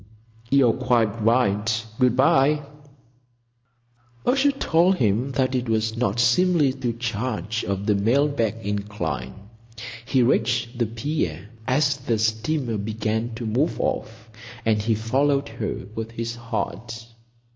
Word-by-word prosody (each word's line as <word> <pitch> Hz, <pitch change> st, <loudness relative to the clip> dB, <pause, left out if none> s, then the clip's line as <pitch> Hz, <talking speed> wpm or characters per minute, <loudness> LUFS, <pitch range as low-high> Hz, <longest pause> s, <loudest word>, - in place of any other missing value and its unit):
You're 130 Hz, -4 st, +4 dB
quite 115 Hz, -4 st, +1 dB
right. 110 Hz, -1 st, +2 dB
Good 125 Hz, -2 st, +3 dB
bye." 140 Hz, +3 st, +3 dB, 1.6 s
A 250 Hz, -, +3 dB
shout 275 Hz, 0 st, +2 dB
told 175 Hz, +4 st, +3 dB
him 120 Hz, -, 0 dB
that 130 Hz, 0 st, +1 dB
it 125 Hz, -2 st, -1 dB
was 110 Hz, 0 st, 0 dB
not 115 Hz, -2 st, 0 dB
seemly 145 Hz, +3 st, +3 dB
to 120 Hz, -3 st, -2 dB
charge 115 Hz, -2 st, -3 dB
up 100 Hz, +1 st, -2 dB
the 105 Hz, -, +3 dB
mail 115 Hz, +9 st, +3 dB
bag 115 Hz, -7 st, -1 dB
incline. 100 Hz, -11 st, -3 dB, 0.7 s
He 130 Hz, 0 st, +2 dB
reached 120 Hz, 0 st, +1 dB
the 120 Hz, -, +2 dB
pier 110 Hz, -, -3 dB, 0.2 s
as 140 Hz, +1 st, +2 dB
the 125 Hz, -4 st, -1 dB
steamer 115 Hz, +3 st, 0 dB
began 110 Hz, +2 st, -2 dB
to 115 Hz, -, -5 dB
move 125 Hz, +9 st, 0 dB
off, 110 Hz, 0 st, -3 dB, 0.3 s
and 110 Hz, -2 st, +2 dB
he 110 Hz, +1 st, +1 dB
followed 135 Hz, +6 st, +1 dB
her 105 Hz, -3 st, -4 dB
with 110 Hz, 0 st, -4 dB
his 115 Hz, 0 st, -4 dB
heart. 115 Hz, -1 st, -5 dB
115 Hz, 135 wpm, -24 LUFS, 110-130 Hz, 1.6 s, You're